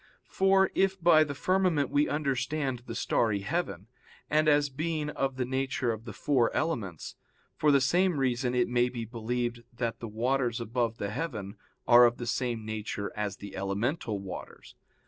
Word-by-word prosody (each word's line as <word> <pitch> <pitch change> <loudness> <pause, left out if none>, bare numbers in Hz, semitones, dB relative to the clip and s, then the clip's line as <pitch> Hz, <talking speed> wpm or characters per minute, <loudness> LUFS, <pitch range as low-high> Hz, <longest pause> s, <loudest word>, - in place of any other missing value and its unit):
For 190 0 +3
if 195 0 +1
by 170 -2 +6
the 145 -2 -5
firmament 180 -4 +1
we 145 +1 +2
understand 140 -2 -1
the 115 - -5
starry 110 -3 +1
heaven, 105 - -3 0.5
and 155 +1 +3
as 145 -1 +4
being 150 +2 -2
of 135 -2 -2
the 130 -1 -1
nature 130 -1 -1
of 110 0 -6
the 115 - -6
four 130 -1 +1
elements, 110 - -3 0.4
for 150 - +3
the 140 - +5
same 175 +5 +2
reason 125 -1 0
it 125 -1 +2
may 120 0 +2
be 120 -2 -5
believed 120 +1 -3
that 120 -1 -3
the 115 - -6
waters 120 +2 0
above 115 0 -1
the 100 0 -3
heaven 110 -8 -4 0.3
are 120 0 +8
of 120 - -2
the 120 - -5
same 120 -1 -2
nature 105 -1 -4
as 105 -2 -3
the 100 0 -9
elemental 105 - -2
waters. 95 -2 -9
125 Hz, 170 wpm, -29 LUFS, 115-150 Hz, 0.5 s, are